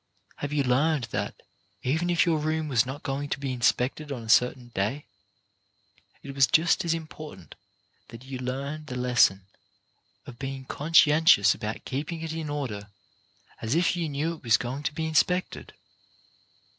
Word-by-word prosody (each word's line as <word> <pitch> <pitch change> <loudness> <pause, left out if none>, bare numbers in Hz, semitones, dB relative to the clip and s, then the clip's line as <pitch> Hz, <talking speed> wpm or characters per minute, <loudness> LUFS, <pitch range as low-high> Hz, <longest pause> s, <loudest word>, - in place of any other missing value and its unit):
Have 145 - -4
you 145 -1 +1
learned 140 +3 +2
that, - - -3 0.5
even 160 +7 0
if 175 -1 +3
your 165 -3 +2
room 155 +1 -1
was 125 -2 +2
not 140 +3 -6
going 140 +1 -3
to 135 - -2
be 135 -2 -3
inspected 125 +4 0
on 125 -4 -5
a 110 - -10
certain 125 +1 +3
day, 115 +7 -2 1.2
it 140 - -7
was 135 -1 +4
just 160 +1 +3
as 165 -1 +1
im 165 -1 -5
portant 150 - -11 0.5
that 115 +1 -12
you 130 -1 -7
learn 140 +4 -4
the 130 - -6
lesson 120 -6 +3 0.8
of 120 - -11
being 135 -1 -5
con 150 +5 -6
scientious 150 -11 +6
about 110 +1 -6
keeping 150 +5 -4
it 165 -1 -4
in 160 -2 -4
order 115 -9 -4 0.7
as 115 +5 -1
if 175 +1 +2
you 170 -3 -2
knew 150 +4 -1
it 165 - -13
was 115 -1 +4
going 130 +3 -4
to 150 - -2
be 160 - -2
inspected? 180 +4 0
140 Hz, 170 wpm, -27 LUFS, 125-155 Hz, 1.2 s, scientious